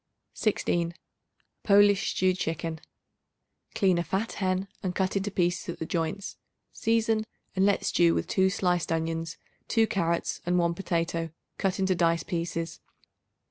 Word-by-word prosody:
16. 170 -5 0 0.7
Polish 205 -1 +5
Stewed 185 0 +3
Chicken. 165 -2 -3 1.0
Clean 185 -3 +3
a - - 0
fat 190 +7 -1
hen 185 0 -1
and 185 -2 -3
cut 190 0 0
into 200 +1 0
pieces 175 -2 0
at - - -14
the 160 - -4
joints; 170 +5 -3 0.4
season 225 -1 +1 0.3
and 190 +1 +4
let 200 - +1
stew 170 -1 +4
with - - 0
2 190 -1 +2
sliced 180 -3 0
onions, 165 0 -2 0.3
2 225 -1 +3
carrots 170 -5 -1
and 175 +1 +1
1 170 -1 +2
potato, 170 -2 -1 0.3
cut 195 -2 0
into 190 -1 +2
dice 170 -2 +2
pieces. 165 0 -3
180 Hz, 140 wpm, -28 LUFS, 165-195 Hz, 1.0 s, Polish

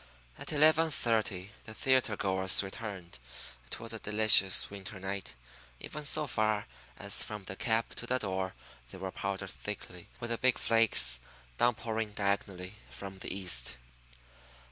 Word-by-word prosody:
At - - -5
eleven 155 +2 +5
thirty 110 -8 -1
the 110 - -9
theatre 130 -5 +2
goers 95 0 +3
returned. 95 - -7 0.5
It - - -7
was 115 0 -6
a 115 - -3
delicious 105 -3 +6
winter 100 0 -8
night. 95 -3 -5 0.4
Even 150 - -7
so 150 +1 +4
far 110 -5 0 0.3
as - - +1
from 105 -2 -5
the 95 - -6
cab 115 +2 0
to 120 - -3
the 125 - +2
door 95 -4 -3 0.3
they - - -10
were 95 0 -5
powdered 95 -1 -4
thickly 100 -4 -7
with 120 0 -5
the 115 - -1
big 130 -1 +3
flakes 105 - +4 0.4
downpouring 110 -2 0
diagonally 100 -1 -2
from 95 -1 -9
the - - -6
east. 85 -11 +2
105 Hz, 145 wpm, -31 LUFS, 95-115 Hz, 0.5 s, delicious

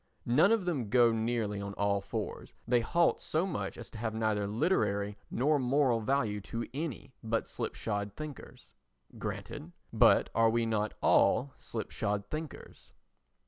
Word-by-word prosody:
None 150 - +4
of 225 -5 +2
them 140 - -1
go 120 0 +5
nearly 110 -2 -1
on 100 0 -5
all 100 0 +1
fours, 105 +2 -5
they 120 0 +4
halt 170 +9 +2
so 160 +4 0
much 105 - -4
as 120 -4 -9
to 110 - -9
have 110 -1 -2
neither 110 -2 0
literary 105 - 0
nor 145 +4 +2
moral 130 -2 +2
value 110 -4 0
to 115 +4 -5
any 145 -3 -5
but 115 0 -1
slipshod 100 -2 -3
thinkers. 155 -3 -9 0.5
Granted, - - -5 0.2
but - - +5
are 115 0 +4
we 115 +1 +1
not 110 -1 -1
all 135 +1 +3
slipshod 105 -2 -3
thinkers? 155 0 -7
115 Hz, 145 wpm, -31 LUFS, 105-140 Hz, 0.5 s, go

